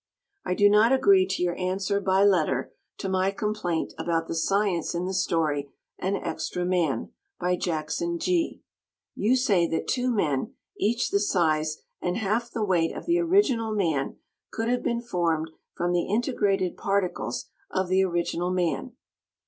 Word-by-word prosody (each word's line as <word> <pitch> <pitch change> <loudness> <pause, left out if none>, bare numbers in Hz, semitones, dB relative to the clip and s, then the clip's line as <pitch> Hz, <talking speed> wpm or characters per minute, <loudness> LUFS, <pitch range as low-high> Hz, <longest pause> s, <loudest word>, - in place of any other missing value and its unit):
I 180 - -1
do 205 - +5
not 210 +3 +5
agree 375 +8 +5
to - - -1
your 175 -1 0
answer, 190 +2 0
by 190 0 +3
letter, 155 -10 +2 0.2
to - - -4
my 190 0 +1
complaint 195 -5 -2
about 165 -1 -1
the - - -3
science 185 0 0
in 175 +1 -1
the 190 - -3
story, 150 -6 0 0.3
"An 190 +2 0
Extra 180 -2 -3
Man," 175 -5 0 0.3
by 180 0 +1
Jackson 170 0 -2
Gee. 340 - 0 0.5
You 235 +5 +2
say 200 -9 +3
that 165 - -2
two 255 0 0
men, 150 - 0 0.2
each 230 - 0
the 400 - +3
size 155 - +1 0.2
and 180 +2 -1
half 225 +2 -1
the 220 -2 -2
weight 170 -4 +1
of - - -7
the 345 0 +2
original 300 - +2
man 160 -9 0 0.3
could 225 +1 -2
have 245 0 +1
been 235 0 -1
formed 165 -8 -1 0.3
from 175 0 0
the 175 -1 +1
integrated 205 -5 0
particles 195 -2 -2 0.2
of 190 -1 -1
the 190 +1 +3
original 175 -1 -1
man. 180 -2 -1
185 Hz, 160 wpm, -26 LUFS, 170-215 Hz, 0.5 s, do